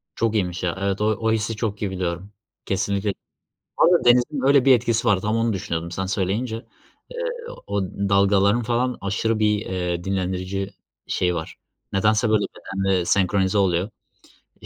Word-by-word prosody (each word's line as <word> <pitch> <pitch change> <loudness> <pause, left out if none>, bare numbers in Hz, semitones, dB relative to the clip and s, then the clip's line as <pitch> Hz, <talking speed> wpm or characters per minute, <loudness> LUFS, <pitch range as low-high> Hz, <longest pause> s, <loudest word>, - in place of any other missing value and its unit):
Çok 115 -1 0
iyiymiş 90 -4 -1
ya. 90 -1 -1
Evet 100 0 -1
o - - +1
o 110 +1 +1
hissi 110 0 -1
çok 105 -2 -3
iyi 100 - -1
biliyorum. 90 +1 -4 0.3
Kesinlikle 100 +1 -1 0.6
ama 175 +1 +4
denizin 125 +4 +3
öyle 140 -2 +5
bir 135 -1 +7
etkisi 115 0 0
var. 100 -3 +3
Tam 105 +3 0
onu 115 0 +1
düşünüyordum 85 -4 -3
sen 95 +2 -3
söyleyince, 100 +5 -1
ııı, 485 - -8
o 100 -1 -1
dalgaların 100 +3 +2
falan 120 +2 0
aşırı 110 +3 -1
bir, 105 -1 +2
eee, 90 -2 -2
dinlendirici 95 0 -2 0.4
şeyi 90 -1 0
var 80 -1 -5 0.4
nedense, 110 +3 +2
böyle, 105 -2 +3
bedenle 95 -1 -1
senkronize 95 +2 +2
oluyor. 95 +1 +1 0.7
İii, - - -12
100 Hz, 155 wpm, -23 LUFS, 95-115 Hz, 0.7 s, bir